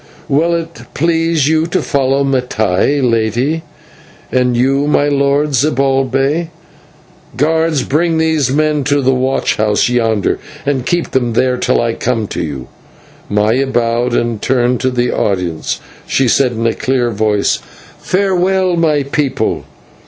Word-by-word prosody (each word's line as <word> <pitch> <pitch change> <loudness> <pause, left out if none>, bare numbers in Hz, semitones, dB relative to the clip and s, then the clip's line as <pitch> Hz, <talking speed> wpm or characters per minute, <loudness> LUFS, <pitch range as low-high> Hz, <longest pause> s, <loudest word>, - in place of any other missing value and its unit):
Will 165 +5 +2
it 165 0 -5
please 165 -2 +1
you 160 +1 +2
to 180 +2 0
follow 135 0 +1
Mattai, 125 -1 0
Lady, 120 +7 0 0.7
and 125 -1 +1
you, 135 +3 +1
my 145 -1 +2
Lord 140 +1 +1
Zibalbay. 135 +2 +1 0.9
Guards, 160 -1 +1
bring 165 +3 0
these 160 -4 +1
men 150 0 +1
to 145 0 +2
the 130 +1 +3
watch 130 +1 0
house 105 +1 +1
yonder, 115 -4 0 0.3
and 135 -3 -1
keep 175 -1 -1
them 120 -3 0
there 125 +2 +2
till 125 - +1
I 115 -1 0
come 115 -2 -1
to - - -3
you." 70 -5 -5 0.6
Maya 110 +6 +1
bowed, 120 -1 0
and, 120 -3 -1
turning 125 -1 +1
to 130 - 0
the 125 -1 0
audience, 90 -5 -2 0.3
she 135 - +1
said 125 +1 +2
in 115 0 -3
a 115 - +2
clear 125 -2 0
voice, 105 -1 +1 0.4
"Farewell, 185 -1 +1
my 155 -4 +2
people. 140 0 -1
135 Hz, 140 wpm, -14 LUFS, 120-150 Hz, 0.9 s, the